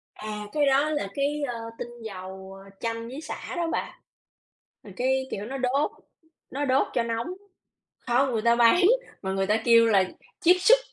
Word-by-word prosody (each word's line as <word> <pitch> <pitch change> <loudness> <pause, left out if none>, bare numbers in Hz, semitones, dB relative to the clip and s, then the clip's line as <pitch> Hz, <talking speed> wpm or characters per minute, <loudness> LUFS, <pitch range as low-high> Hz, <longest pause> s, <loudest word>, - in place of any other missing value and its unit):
À, 210 -1 -6
cái 295 -1 +2
đó 275 +3 +3
là 295 -10 -1
cái, 290 +1 -1
ơ, 235 -1 -4 0.2
tinh 240 0 -8
dầu 190 -1 -8 0.2
chanh 230 0 -3
với 270 +5 -7
xả 315 - -6
đó 340 -1 -1
bà. - - -4 0.8
Rồi 200 - -12
cái, 265 +1 +1
kiểu, 205 +1 -4
nó 270 +3 -5
đốt 265 +3 +1 0.6
nó 285 +2 -2
đốt 265 +1 +2
cho 235 - +1
nóng. 230 +2 -2 0.8
Không, 255 +2 +2
người 220 -2 0
ta 235 +1 +4
bán 240 +10 +5 0.4
mà 190 -1 -3
người 195 0 0
ta 210 +1 +3
kêu 230 -1 +7
là 200 -4 +4 0.4
chiết 355 +2 +6
xuất - - +6
240 Hz, 180 wpm, -26 LUFS, 215-275 Hz, 0.8 s, kêu